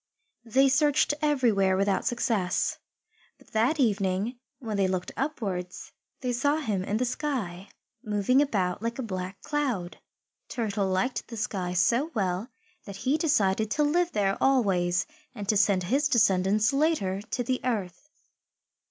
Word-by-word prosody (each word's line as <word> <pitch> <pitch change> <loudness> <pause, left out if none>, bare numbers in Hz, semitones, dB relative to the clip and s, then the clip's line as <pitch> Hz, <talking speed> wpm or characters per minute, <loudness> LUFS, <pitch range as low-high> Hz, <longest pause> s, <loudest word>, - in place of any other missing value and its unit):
They 265 +4 +4
searched 290 +2 +3
everywhere 230 -11 +2
without 195 0 +1
success. 225 -7 0 0.6
But - - -22
that 235 +8 +1
evening, 205 0 0 0.2
when 225 -5 -5
they 195 -1 +2
looked 185 -1 -2
upwards, 195 -11 -4 0.3
they 250 -2 -1
saw 285 +5 +2
him 210 -11 -2
in 205 +3 -1
the 250 - 0
sky, 235 - -3 0.3
moving 215 +4 +2
about 195 -10 0
like 230 +1 -3
a 265 - -3
black 185 -3 -5
cloud. 250 -12 -2 0.5
Turtle 205 -4 -1
liked 190 +7 -1
the 230 - -8
sky 185 -4 -2
so 235 - +2
well 190 +2 -1 0.4
that 200 - -8
he 265 +3 +3
decided 220 - +1
to 300 +7 +1
live 345 +4 +1
there 195 -2 0
always 195 -8 +2 0.3
and 205 -1 -6
to 215 - +3
send 200 -2 +3
his 275 +10 +1
descendants, 215 -1 +3
later, 275 - +1
to 235 +4 -3
the 255 +1 -1
earth. 215 +1 -3
215 Hz, 145 wpm, -27 LUFS, 190-265 Hz, 0.6 s, They